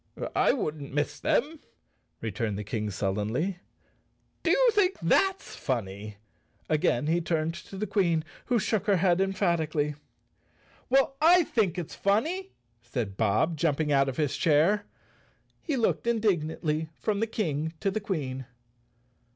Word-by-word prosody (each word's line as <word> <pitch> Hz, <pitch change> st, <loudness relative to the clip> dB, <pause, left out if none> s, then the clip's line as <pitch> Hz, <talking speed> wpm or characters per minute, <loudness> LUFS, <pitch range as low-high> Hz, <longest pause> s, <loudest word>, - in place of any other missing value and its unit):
"I -, -, +4 dB
wouldn't 150 Hz, -, -3 dB
miss 145 Hz, 0 st, -1 dB
'em," 310 Hz, 0 st, +1 dB, 0.6 s
replied 110 Hz, -1 st, -2 dB
the 105 Hz, -, -4 dB
King 105 Hz, 0 st, -3 dB
sullenly. 105 Hz, -, -1 dB, 0.8 s
"Do -, -, 0 dB
you -, -, +5 dB
think 395 Hz, -3 st, +2 dB
that's 385 Hz, 0 st, +1 dB
funny?" 105 Hz, -4 st, -4 dB, 0.5 s
Again 145 Hz, -4 st, +1 dB
he 165 Hz, +3 st, +1 dB
turned 160 Hz, -1 st, -1 dB
to 170 Hz, +3 st, -10 dB
the 210 Hz, -, -1 dB
Queen, 180 Hz, -6 st, +1 dB, 0.2 s
who 245 Hz, -, +2 dB
shook 215 Hz, -2 st, 0 dB
her 200 Hz, -, +5 dB
head 180 Hz, 0 st, +3 dB
emphatically. 170 Hz, -6 st, 0 dB, 1.0 s
"Well, 270 Hz, +1 st, +3 dB
I 345 Hz, +3 st, +7 dB
think 205 Hz, -, 0 dB
it's 175 Hz, -4 st, -5 dB
funny!" 320 Hz, -, 0 dB, 0.3 s
said 120 Hz, -4 st, -4 dB
Bob, 110 Hz, -, +1 dB
jumping 150 Hz, -1 st, +1 dB
out 135 Hz, -1 st, +3 dB
of 130 Hz, -, -6 dB
his 145 Hz, -2 st, 0 dB
chair. 170 Hz, +8 st, +3 dB, 0.7 s
He 295 Hz, -4 st, -2 dB
looked 235 Hz, 0 st, 0 dB
indignantly 160 Hz, -8 st, 0 dB
from 210 Hz, -2 st, -1 dB
the 225 Hz, -, +1 dB
King 160 Hz, -8 st, -2 dB
to 195 Hz, -, +1 dB
the 215 Hz, -, -1 dB
Queen. 135 Hz, -, -3 dB
165 Hz, 140 wpm, -28 LUFS, 140-215 Hz, 1.0 s, I